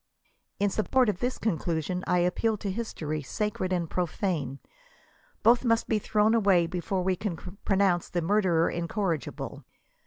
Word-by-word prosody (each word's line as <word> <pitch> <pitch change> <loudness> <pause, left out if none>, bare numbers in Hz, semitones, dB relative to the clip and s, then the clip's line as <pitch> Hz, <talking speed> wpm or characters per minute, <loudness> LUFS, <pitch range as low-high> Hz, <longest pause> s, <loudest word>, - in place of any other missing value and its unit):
In 200 0 +2
support 245 +4 +2
of 195 - -2
this 250 +1 -1
conclusion 175 -3 -1
I 180 - +3
appeal 215 +5 +1
to 200 -1 -3
history, 160 -8 -3
sacred 190 +5 -2
and 175 -2 0
profane. 165 -5 -2 0.9
Both 235 +3 +5
must 230 -2 +2
be 220 - +1
thrown 210 +1 +2
away 195 -6 +4
before 180 +2 -2
we 185 0 +1
can 190 -1 -3 0.3
pronounce 190 -3 +2
the 175 -2 -1
murderer 175 -3 +3
incorrigible. 170 -2 -3
185 Hz, 145 wpm, -28 LUFS, 170-210 Hz, 0.9 s, Both